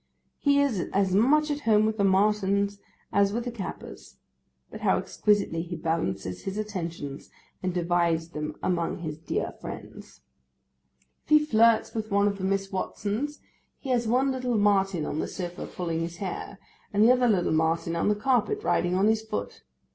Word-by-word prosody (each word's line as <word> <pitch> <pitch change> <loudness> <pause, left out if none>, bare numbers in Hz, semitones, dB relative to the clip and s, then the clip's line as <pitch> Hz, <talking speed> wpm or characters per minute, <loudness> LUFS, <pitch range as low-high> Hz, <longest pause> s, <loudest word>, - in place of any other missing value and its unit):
He 285 -1 +3
is 255 -11 0
as 190 -1 +2
much 295 +9 +4
at 290 - -2
home 215 -5 +3
with 220 0 -1
the - - +3
Martins 200 0 +2 0.3
as 200 0 +3
with 235 +3 -2
the 245 - -3
Cappers; 65 - -8 0.5
but - - -9
how - - +3
exquisitely 205 -6 +1
he 175 +1 -5
balances 100 - -2
his 195 +1 -3
attentions, 170 -9 -5 0.3
and 185 - -1
divides 170 -2 +1
them 150 -1 -5
among 170 -1 -1
his 155 -2 -5
dear 165 - -2
friends! - - -9 1.0
If - - -29
he 305 0 +6
flirts 230 -4 +4
with 220 -1 -3
one 200 0 +3
of 200 -1 -2
the - - -5
Miss 195 0 -1
Watsons, 210 +9 -3 0.4
he 270 - -5
has 240 -2 +1
one 260 +4 +2
little 250 -3 -1
Martin 195 -5 +2
on 150 - -3
the - - -1
sofa 175 -2 -6
pulling 165 -2 -3
his 170 +1 -4
hair, 195 +1 -5 0.3
and 205 +1 +3
the 235 - +7
other 250 -1 +3
little 185 -7 +2
Martin 165 +1 +1
on 170 - 0
the 210 - +3
carpet 260 - +1
riding 175 +1 +1
on 190 +2 +3
his 220 0 +3
foot. 100 - -5
200 Hz, 175 wpm, -27 LUFS, 170-220 Hz, 1.0 s, the